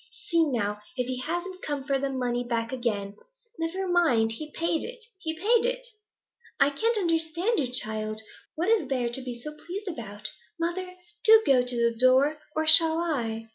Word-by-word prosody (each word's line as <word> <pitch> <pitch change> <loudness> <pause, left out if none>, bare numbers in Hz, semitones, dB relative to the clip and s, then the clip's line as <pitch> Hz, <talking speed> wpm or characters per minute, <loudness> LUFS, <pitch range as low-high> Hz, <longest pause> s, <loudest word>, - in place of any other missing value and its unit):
See, 335 -2 +3
now, 210 -6 -1 0.2
if 250 - 0
he 255 0 -4
hasn't 350 +6 -4
come 290 -2 -3
for 275 -1 0
the 275 0 -1
money 245 -2 -1
back 230 -2 -2
again.' 210 -6 -2 0.4
'Never 360 +4 -2
mind; 310 -11 +3
he 300 +7 -7
paid 335 0 -1
it! - - -7 0.2
He 320 -3 -3
paid 450 +6 +3
it!' - - -1 0.7
'I 280 - +5
can't 455 +10 +1
understand 335 +4 +1
you, 255 -4 -1
child. 215 -3 -2 0.4
What 335 +4 -1
is 440 -11 +3
there 255 -3 0
to 265 - 0
be 250 -2 -6
so 300 +5 -7
pleased 375 +7 -7
about?' 215 - -6 0.3
'Mother, 365 +2 -3 0.3
do 445 0 +7
go 255 -2 +4
to 245 0 -3
the 235 -1 +1
door. 260 +5 +4 0.2
Or 315 0 0
shall 320 0 +8
I?' 230 -10 -2
290 Hz, 180 wpm, -27 LUFS, 240-345 Hz, 0.7 s, shall